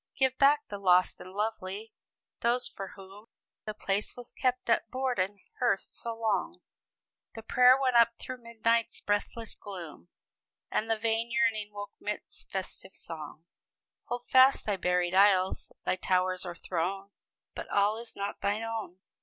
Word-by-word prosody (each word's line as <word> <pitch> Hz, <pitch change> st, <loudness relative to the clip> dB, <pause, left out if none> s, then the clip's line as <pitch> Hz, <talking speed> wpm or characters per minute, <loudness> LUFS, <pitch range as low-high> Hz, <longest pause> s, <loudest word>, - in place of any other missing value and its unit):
"Give 265 Hz, -1 st, +3 dB
back 290 Hz, +1 st, +5 dB
the 205 Hz, -, -6 dB
lost 180 Hz, -2 st, +4 dB
and 185 Hz, -, -10 dB
lovely! 210 Hz, +1 st, -3 dB, 0.5 s
those 240 Hz, +1 st, +2 dB
for 195 Hz, -1 st, -8 dB
whom 195 Hz, +3 st, -13 dB, 0.4 s
The 215 Hz, -1 st, -4 dB
place 200 Hz, 0 st, -1 dB
was 245 Hz, -1 st, -8 dB
kept 255 Hz, -1 st, -1 dB
at 230 Hz, -1 st, +2 dB
board 255 Hz, -3 st, -1 dB
and 195 Hz, +2 st, -1 dB, 0.2 s
hearth 240 Hz, -6 st, +2 dB
so 230 Hz, -1 st, -4 dB
long, 230 Hz, +10 st, -1 dB, 0.7 s
The 225 Hz, -, -8 dB
prayer 250 Hz, +3 st, +6 dB
went 255 Hz, -2 st, +2 dB
up 235 Hz, 0 st, +6 dB
through 255 Hz, -1 st, -7 dB
midnight's 230 Hz, 0 st, 0 dB
breathless 205 Hz, +2 st, -2 dB
gloom, 170 Hz, -, -9 dB, 0.6 s
And 220 Hz, -, 0 dB
the 225 Hz, -, +2 dB
vain 225 Hz, +1 st, 0 dB
yearning 225 Hz, -3 st, +1 dB
woke 205 Hz, 0 st, -7 dB
'midst 210 Hz, 0 st, -6 dB
festive 190 Hz, 0 st, -6 dB
song! 155 Hz, 0 st, -8 dB, 0.6 s
Hold 245 Hz, 0 st, -5 dB
fast 260 Hz, +1 st, +6 dB
thy 205 Hz, -, +1 dB
buried 180 Hz, -1 st, +1 dB
isles, 190 Hz, -1 st, +4 dB
thy -, -, +1 dB
towers 185 Hz, 0 st, +1 dB
or 175 Hz, -, -5 dB
throne 190 Hz, +4 st, -3 dB, 0.4 s
But -, -, -7 dB
all 205 Hz, +2 st, +2 dB
is 235 Hz, 0 st, -10 dB
not 200 Hz, +1 st, -4 dB
thine 205 Hz, +2 st, 0 dB
own. 220 Hz, -5 st, -5 dB
210 Hz, 155 wpm, -30 LUFS, 190-235 Hz, 0.7 s, prayer